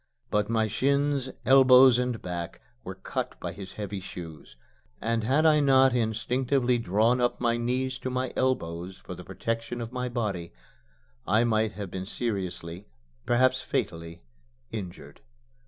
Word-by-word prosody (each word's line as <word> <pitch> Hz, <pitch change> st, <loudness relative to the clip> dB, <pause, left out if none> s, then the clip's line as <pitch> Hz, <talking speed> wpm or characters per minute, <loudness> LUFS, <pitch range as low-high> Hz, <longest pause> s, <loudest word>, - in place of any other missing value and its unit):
But 105 Hz, 0 st, +1 dB
my 110 Hz, -1 st, +2 dB
shins, 140 Hz, +3 st, +1 dB, 0.2 s
elbows, 130 Hz, -2 st, +7 dB
and 125 Hz, -2 st, -1 dB
back 85 Hz, -2 st, -5 dB, 0.2 s
were -, -, -6 dB
cut -, -, -5 dB
by -, -, -4 dB
his 95 Hz, -1 st, -9 dB
heavy 100 Hz, -1 st, -5 dB
shoes; 80 Hz, -8 st, -10 dB, 0.4 s
and 115 Hz, 0 st, -1 dB
had 135 Hz, +8 st, +2 dB
I 155 Hz, -1 st, +6 dB
not 135 Hz, -2 st, +5 dB
instinctively 125 Hz, +2 st, +1 dB
drawn 115 Hz, +4 st, +2 dB
up 120 Hz, -, +1 dB
my 120 Hz, -1 st, +1 dB
knees 130 Hz, +2 st, -1 dB
to 130 Hz, -, -3 dB
my 130 Hz, 0 st, -2 dB
elbows 90 Hz, -8 st, -1 dB
for -, -, -9 dB
the -, -, -9 dB
protection 115 Hz, +1 st, -4 dB
of 115 Hz, 0 st, -5 dB
my 125 Hz, 0 st, -2 dB
body, 100 Hz, -, -3 dB, 0.7 s
I 110 Hz, +2 st, +4 dB
might 110 Hz, -2 st, +1 dB
have 100 Hz, -2 st, -6 dB
been 95 Hz, 0 st, -5 dB
seriously, 95 Hz, -6 st, -4 dB, 0.4 s
perhaps 130 Hz, +2 st, +3 dB
fatally, 85 Hz, -3 st, -4 dB, 0.5 s
injured. 85 Hz, -8 st, -8 dB
115 Hz, 145 wpm, -27 LUFS, 95-130 Hz, 0.7 s, elbows